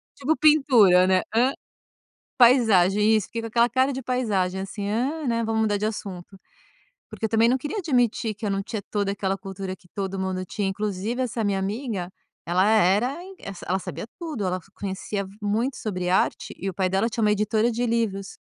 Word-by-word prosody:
tipo 300 +3 0
pintura, 245 -12 +5
né. 185 -1 +3
Hã? 250 +4 +3 0.8
Paisagem, 220 -4 +5
isso 210 - -1
fiquei 230 - -5
com - - -4
aquela 235 +1 +3
cara 260 +3 +2
de 265 0 -5
paisagem, 200 -7 -1
assim: 200 +1 -5
"Hã, 270 +8 -1
né, 230 -1 0
vamos 220 0 0
mudar 210 -1 +1
de 210 +1 -1
assunto". 195 -3 -6 0.7
Porque 225 - -4
eu - - -1
também 225 +1 +4
não 260 - +3
queria 295 - -5
admitir 245 - +1
que 210 +1 -7
eu - - 0
não 195 0 -1
tinha 215 0 -5
toda 200 -2 0
aquela 195 -1 -2
cultura 195 -1 -6
que 180 - -24
todo 195 -1 -3
mundo 190 -1 -2
tinha. 195 +2 -2
Inclusive, 210 +4 -2
essa 235 -2 -2
minha 200 -1 0
amiga, 200 -2 -3 0.4
ela 180 +3 +2
era 220 - +3
in 385 +1 -11
ela 195 - -7
sa - - -10
ela 190 +1 +1
sabia 205 - -6
tudo, 305 - -4
ela 185 0 0
f 190 +2 -16
conhecia 200 0 -4 0.2
muito 225 +6 0
sobre 180 -4 -3
arte 185 - 0
e 195 - -3
o 190 - -6
pai 185 0 0
dela 195 +5 +1
tinha 230 - -3
uma 210 -1 +4
editora 215 +2 +1
de 240 +2 -1
livros. 220 -4 -2
210 Hz, 205 wpm, -24 LUFS, 195-235 Hz, 0.8 s, pintura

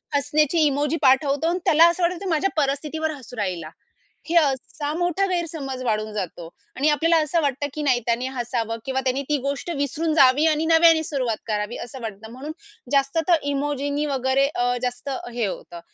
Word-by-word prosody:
हसण्याची 295 +3 +2
emoji 290 +2 +1
पाठवतो 275 +2 +3
आणि 355 +2 -1
त्याला 325 +2 +6
असं 345 +1 -2
वाटतं, 345 +1 +1
की - - -2
माझ्या 330 +4 +1
परिस्थितीवर 305 +3 -2
हसू 255 -5 -10
राहिला. 180 -6 -3 0.6
हे 340 - -1
असा 290 0 0
मोठा 355 +2 +1
गैरसमज 315 -8 -3
वाढून 215 -2 -1
जातो 180 -4 -5 0.3
आणि 285 +4 +3
आपल्याला 330 +3 +3
असं 330 +3 0
वाटतं 285 -1 -1
की 305 - -4
नाही 255 -4 +3
त्याने 240 +2 0
हसावं 235 -2 -2
किंवा 265 0 -1
त्यांनी 260 +1 +1
ती 300 - +2
गोष्ट 280 +5 -3
विसरून 300 +3 -1
जावी 270 +1 +5
आणि 310 0 +1
नव्याने 325 0 +5
सुरुवात 255 -8 -2
करावी 210 +1 -2
असं 250 +2 -10
वाटतं 220 0 -7
म्हणून 265 +5 -7 0.4
जास्त 275 +2 +2
तर 345 - +7 0.2
इमोजीनी 285 +1 -1
वगैरे 270 0 +1
अ, 245 -3 0
जास्त 250 +2 -3 0.2
हे 235 -2 -1
होतं. 175 -3 -6
280 Hz, 175 wpm, -23 LUFS, 245-315 Hz, 0.6 s, तर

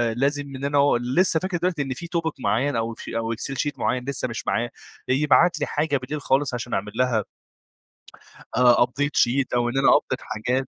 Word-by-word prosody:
لازم 140 +3 0
إن 135 +2 -5
أنا 140 0 +1
و 140 -3 +4
لسه 160 +8 +2
فاكر 185 0 -2
دلوقتي 170 -3 -1
إن 135 -1 -2
في 170 +6 -8
توبيك 165 -2 -2
معين 130 +4 0
أو 115 0 -1
أفشي 115 - -6
أو 115 0 -1
Excel 130 +4 -5
شيت 145 - -2
معين 125 0 0
لسه 140 -2 -2
مش 120 - -6
معاه، 120 +1 0 0.4
يبعت 150 +6 +3
لي - - 0
حاجة 145 -1 0
بالليل 140 +3 -5
خالص 135 0 +1
عشان 120 0 -4
أعمل 105 +2 -2
لها 125 -4 +1 1.3
آه، 120 -1 +5
update 145 +4 -2
شيت 130 +2 +2
أو 120 0 +1
إن 135 - -3
أنا 135 - +3
أupdate - - -4
حاجات. 125 +4 -2
135 Hz, 200 wpm, -24 LUFS, 120-145 Hz, 1.3 s, آه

